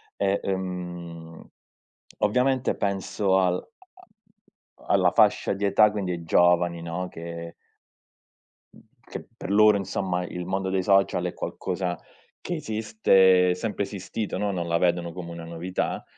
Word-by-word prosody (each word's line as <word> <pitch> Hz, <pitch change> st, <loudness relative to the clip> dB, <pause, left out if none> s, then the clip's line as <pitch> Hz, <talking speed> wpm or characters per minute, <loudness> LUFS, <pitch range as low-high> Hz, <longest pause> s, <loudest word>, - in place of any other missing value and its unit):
E, 100 Hz, 0 st, +1 dB
ehm, 90 Hz, -3 st, -5 dB, 0.7 s
ovviamente 125 Hz, +4 st, +1 dB
penso 100 Hz, 0 st, 0 dB
al 90 Hz, -2 st, +2 dB
a -, -, -9 dB, 1.2 s
a -, -, -17 dB
alla -, -, +4 dB
fascia -, -, +3 dB
di 100 Hz, +1 st, -2 dB
età 105 Hz, +2 st, +5 dB
quindi 100 Hz, -4 st, -3 dB
ai 85 Hz, -1 st, -4 dB
giovani, 85 Hz, 0 st, +3 dB
no, 85 Hz, +2 st, -4 dB
che 85 Hz, 0 st, -8 dB, 1.2 s
uhm, -, -, -17 dB, 0.2 s
che -, -, -8 dB
per 95 Hz, -, -6 dB
loro 105 Hz, 0 st, +6 dB
insomma 95 Hz, -2 st, -2 dB
il 90 Hz, 0 st, -6 dB
mondo 95 Hz, +1 st, -2 dB
dei 95 Hz, -1 st, 0 dB
social 100 Hz, 0 st, +2 dB
è -, -, -3 dB
qualcosa 90 Hz, -2 st, -3 dB, 0.4 s
che 175 Hz, -, -3 dB
esiste, 95 Hz, -, +3 dB
sempre 105 Hz, +1 st, -3 dB
esistito, 100 Hz, +2 st, -5 dB
no, 105 Hz, -1 st, -1 dB
non 85 Hz, -3 st, -3 dB
la 85 Hz, 0 st, +1 dB
vedono 85 Hz, -1 st, +1 dB
come 85 Hz, -2 st, -7 dB
una 85 Hz, -1 st, -8 dB
novità. 85 Hz, +2 st, -3 dB
95 Hz, 140 wpm, -25 LUFS, 85-100 Hz, 1.2 s, loro